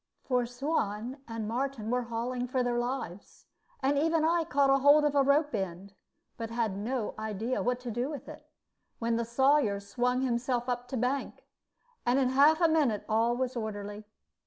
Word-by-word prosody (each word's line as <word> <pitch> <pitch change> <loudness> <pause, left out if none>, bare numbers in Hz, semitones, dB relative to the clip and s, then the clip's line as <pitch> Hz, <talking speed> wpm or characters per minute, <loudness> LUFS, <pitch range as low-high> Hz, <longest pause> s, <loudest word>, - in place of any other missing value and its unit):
For 250 -2 0
Suan 245 -2 -2
and 225 -2 -4
Martin 240 -1 -2
were 250 0 +1
hauling 245 +2 -3
for 255 0 0
their 240 -1 0
lives, 240 -7 -5 0.4
and 280 +1 +2
even 320 +1 +2
I 335 0 +2
caught 275 -2 +3
hold 290 +2 +6
of 295 - +2
a 285 - +4
rope 290 +2 +2
end, 190 -1 -4 0.4
but 230 -1 -4
had 230 -4 -1
no 225 +3 -2
idea 220 +3 -2
what 245 0 0
to 245 -2 -5
do 240 +5 -2
with 295 -3 -7
it, - - -11 0.5
when 230 0 0
the 235 0 -1
Sawyer 260 -3 +3
swung 245 +5 -1
himself 245 0 -1
up 245 0 -2
to 255 - -4
bank, 255 +4 -2 0.6
and 245 +2 +2
in 265 -2 +3
half 285 +5 +5
a 335 - +6
minute 290 -10 +1
all 230 +2 +2
was 255 0 -2
orderly. 210 -2 -5
245 Hz, 180 wpm, -30 LUFS, 225-275 Hz, 0.6 s, hold